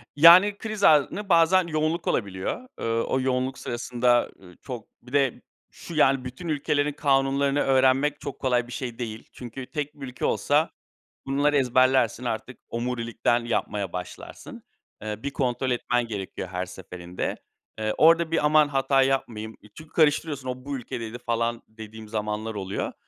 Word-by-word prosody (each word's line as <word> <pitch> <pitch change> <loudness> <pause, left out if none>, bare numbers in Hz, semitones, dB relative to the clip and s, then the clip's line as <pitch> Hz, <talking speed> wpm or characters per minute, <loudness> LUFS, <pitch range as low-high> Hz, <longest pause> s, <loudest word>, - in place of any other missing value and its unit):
Yani, 180 +7 +8
kriz 215 -2 -5
anında 160 +7 +4
bazen 170 +1 +5
yoğunluk 155 +1 -1
olabiliyor. 100 - -2
Iıı, 115 0 0
o 130 - 0
yoğunluk 130 0 -1
sırasında, 120 0 +1
ııı, 90 -2 -16
çok 120 -5 -7
bir 125 +2 -15
de 135 -3 +1 0.3
şu, 170 - -10
yani, 135 -3 +3
bütün 130 +8 -7
ülkelerin 145 -1 0
kanunlarını 140 0 +2
öğrenmek 135 +2 +3
çok - - -6
kolay 125 -2 +1
bir - - -11
şey 120 -1 -5
değil. 110 -2 -6
Çünkü 125 +1 -8
tek 150 -2 -3
bir 135 -2 -8
ülke 125 0 -4
olsa - - +2 0.6
bunları 145 +2 +2
ezberlersin, 130 -2 +3
artık 120 +2 -4
omurilikten 120 0 -1
yapmaya 105 -5 -2
başlarsın. 90 0 -8 0.4
Eee, 105 0 -5
bir 140 - -2
kontrol 130 -1 -1
etmen 120 0 0
gerekiyor 95 -4 -5
her 90 0 -3
seferinde. 90 -1 -6 0.4
Eee, 110 0 -1
orada 165 +1 +5
bir 165 -2 +1
aman 150 0 +5
hata 135 -1 +2
yapmayayım. 120 -5 -1
E, - - -16
çünkü 155 0 -13
karıştırıyorsun 150 -3 +1
o, 125 0 -5
bu 140 0 -3
ülkedeydi 115 -2 -6
falan 115 -1 -1
dediğim 110 0 -11
zamanlar 105 +1 -3
oluyor. 95 -1 -3
130 Hz, 155 wpm, -25 LUFS, 115-145 Hz, 0.6 s, Yani